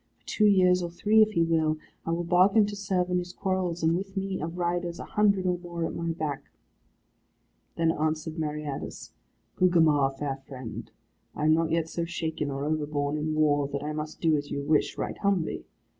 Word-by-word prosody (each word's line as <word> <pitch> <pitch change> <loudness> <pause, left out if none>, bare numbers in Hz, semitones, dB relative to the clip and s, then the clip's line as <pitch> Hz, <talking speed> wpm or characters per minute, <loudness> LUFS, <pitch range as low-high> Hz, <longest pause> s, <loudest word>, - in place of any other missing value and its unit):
For - - -38
two 215 - +1
years, 185 -2 +5
or 175 - -3
three, 210 +6 +3
if 215 0 +4
he 170 - +3
will, 160 -2 +1 0.3
I - - 0
will 170 +1 0
bargain 185 +5 +4
to 205 0 -5
serve 190 -3 -1
in 180 - +2
his 175 0 -6
quarrels, 185 -3 -2
and 165 +1 +3
with 195 +2 -5
me, 195 -2 -2
of 165 +3 -4
riders, 175 0 -1
a - - -6
hundred 205 -3 +2
or 180 -1 +1
more 170 -1 -4
at - - -4
my 170 0 -3
back." 155 -4 -3 1.3
Then 165 -1 +2
answered 155 +1 -2
Meriadus, 150 -2 -4 0.5
"Gugemar, 160 -6 +4
fair 135 -1 -3
friend, 130 -4 -8 0.5
I 150 - -1
am 155 - +5
not 165 0 +2
yet 165 0 0
so 170 +1 -3
shaken 160 -3 -3
or 140 +1 -3
overborne 150 -1 -1
in 155 +1 -2
war, 145 -2 +3
that 140 0 -4
I 150 +1 -3
must 155 0 -5
do 160 -2 +3
as 145 0 -3
you 140 - -3
wish, 150 +1 +1
right - - -4
humbly. 195 -5 0
165 Hz, 200 wpm, -27 LUFS, 150-180 Hz, 1.3 s, years